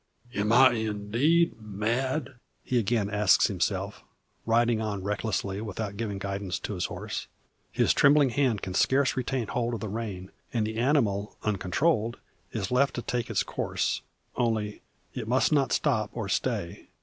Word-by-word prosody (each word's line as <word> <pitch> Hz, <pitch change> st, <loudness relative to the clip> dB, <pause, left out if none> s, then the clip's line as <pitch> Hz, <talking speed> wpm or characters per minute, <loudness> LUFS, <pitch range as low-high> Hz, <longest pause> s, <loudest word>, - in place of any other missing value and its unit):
"Am 105 Hz, +2 st, 0 dB
I 130 Hz, +3 st, +7 dB
indeed 115 Hz, +7 st, +1 dB
mad?" 120 Hz, +7 st, -1 dB, 0.3 s
he 125 Hz, -, +1 dB
again 110 Hz, -1 st, +1 dB
asks 105 Hz, -2 st, +4 dB
himself, -, -, -2 dB, 0.4 s
riding 115 Hz, 0 st, +3 dB
on 100 Hz, -3 st, -3 dB
recklessly, 100 Hz, -1 st, -2 dB
without 105 Hz, -1 st, -4 dB
giving 105 Hz, -2 st, -3 dB
guidance 100 Hz, -1 st, -3 dB
to -, -, -4 dB
his 90 Hz, -, -2 dB
horse. -, -, -5 dB, 0.4 s
His -, -, +3 dB
trembling 140 Hz, -2 st, +5 dB
hand 125 Hz, -5 st, +1 dB
can 95 Hz, -, -4 dB
scarce 130 Hz, +7 st, +3 dB
retain 130 Hz, -1 st, -1 dB
hold 120 Hz, +2 st, -1 dB
of -, -, -5 dB
the 110 Hz, -, -4 dB
rein; 100 Hz, -4 st, -5 dB, 0.2 s
and 115 Hz, -3 st, 0 dB
the 110 Hz, +1 st, -4 dB
animal, 115 Hz, -6 st, +1 dB
uncontrolled, 110 Hz, -, +1 dB, 0.3 s
is 105 Hz, -2 st, -3 dB
left 135 Hz, +2 st, +2 dB
to 120 Hz, -, -3 dB
take 120 Hz, -1 st, -2 dB
its 110 Hz, -4 st, +1 dB
course -, -, -2 dB, 0.3 s
only, 110 Hz, -3 st, -1 dB, 0.3 s
it -, -, -5 dB
must 130 Hz, +6 st, +2 dB
not 140 Hz, -4 st, +2 dB
stop 110 Hz, -8 st, +1 dB
or 110 Hz, -4 st, -4 dB
stay. 100 Hz, -4 st, -2 dB
110 Hz, 155 wpm, -28 LUFS, 105-125 Hz, 0.4 s, I